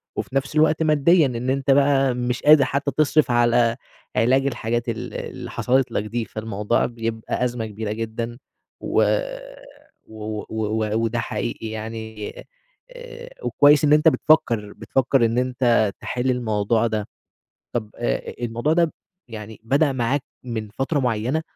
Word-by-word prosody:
وفي 135 - -5
نفس 135 +3 -1
الوقت 155 +1 +3
ماديًا، 155 +2 +4
إن 125 -1 -2
أنت 135 0 +1
بقى 135 -1 +4
مش 125 0 -2
قادر 150 -1 +7
حتى 140 +2 -1
تصرف 155 -3 +3
على 120 -1 +3 0.4
علاج 130 +4 +3
الحاجات 120 -2 -2
ال 115 - -5
اللي - - -6
حصلت 130 -1 +1
لك 105 - -1
دي، 115 +2 -3
فالموضوع 110 0 -1
بيبقى 115 0 -3
أزمة 120 -2 -2
كبيرة 110 0 -5
جدًا، 115 +2 -4 0.4
و - - +2 1.0
و 110 -1 -6
و 110 0 -1
وده 115 +1 0
حقيقي 115 -1 -4
يعني 110 -1 -6 0.6
آآ - - -10
وكويس 145 0 +5
إن 150 0 +5
أنت 150 +2 +5
بتفكر 115 -10 +2
بتفكر 120 +3 +1
إن 115 +1 0
أنت 125 -4 +2
تحل 125 +1 -1
الموضوع 115 -1 +1
ده، 110 -2 -2 0.7
طَب 110 -3 -3
آآ - - -2
الموضوع 120 +6 0
ده 170 -1 +2 0.4
يعني 110 -1 -9
بدأ 140 +4 +2
معاك 130 +2 0 0.2
من 110 -4 -4
فترة 135 +7 -2
مُعيّنة، 125 +5 0
120 Hz, 140 wpm, -22 LUFS, 110-135 Hz, 1.0 s, قادر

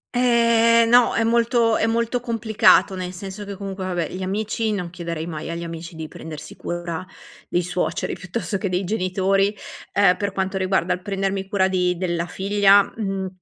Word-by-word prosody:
Ehm, 230 -1 +4
no, 245 0 +5
è 225 - +2
molto 230 0 +2
è 225 - +1
molto 235 +2 0
complicato; 225 -4 +3
nel 185 -1 -5
senso 195 +2 -7
che 200 -1 -6
comunque 195 -1 -6
vabbè 175 -4 -2
gli 185 - -6
amici: 215 +3 -1
non 180 -4 -3
chiederei 170 -2 -5
mai 160 -1 -6
agli 170 0 -4
amici 165 0 -7
di 160 -1 -6
prendersi 155 -1 -9
cura; 175 0 -4 0.5
i 175 - +1
suoceri, 175 -2 -2
piuttosto 200 +2 -4
che 195 - -2
dei 180 +1 -1
genitori, 195 +1 +1 0.4
ehm, 195 -2 +4
per 200 -1 -2
quanto 190 0 -2
riguarda 185 -1 +1
il 180 - -5
prendermi 195 0 -2
cura 195 -2 +2
di 180 -1 0
della 175 -1 -2
figlia; 200 +1 +4
mhmm, 195 -3 -3
195 Hz, 175 wpm, -22 LUFS, 180-215 Hz, 0.5 s, no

